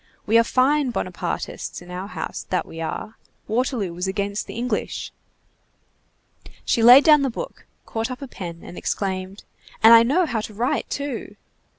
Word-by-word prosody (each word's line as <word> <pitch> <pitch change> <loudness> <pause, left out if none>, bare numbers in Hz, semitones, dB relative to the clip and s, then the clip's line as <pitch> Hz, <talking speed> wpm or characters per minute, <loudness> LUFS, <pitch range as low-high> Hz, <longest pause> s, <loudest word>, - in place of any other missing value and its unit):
We 225 +2 +5
are - - +5
fine 265 +4 +2
Bonapartists 240 - -4
in 180 0 -13
our 185 +2 -5
house, - - -6
that 185 - 0
we 165 - -9
are! 165 +7 -5 0.3
Waterloo 225 -5 -1
was 180 +2 -3
against 200 +1 -2
the - - -8
English." 245 +2 -3 1.5
She 235 - +1
laid 245 +5 +9
down 300 -2 +6
the 275 - +1
book, - - -7 0.2
caught 225 +2 -3
up 255 - -6
a - - -6
pen, 170 -8 -8
and 175 - -9
exclaimed:— 190 0 -3 0.4
"And 225 +1 +10
I 230 - +9
know 290 +10 +2
how 235 -7 -2
to 215 -1 -8
write, 240 +5 -1
too!" 285 -2 -4
225 Hz, 170 wpm, -23 LUFS, 190-255 Hz, 1.5 s, And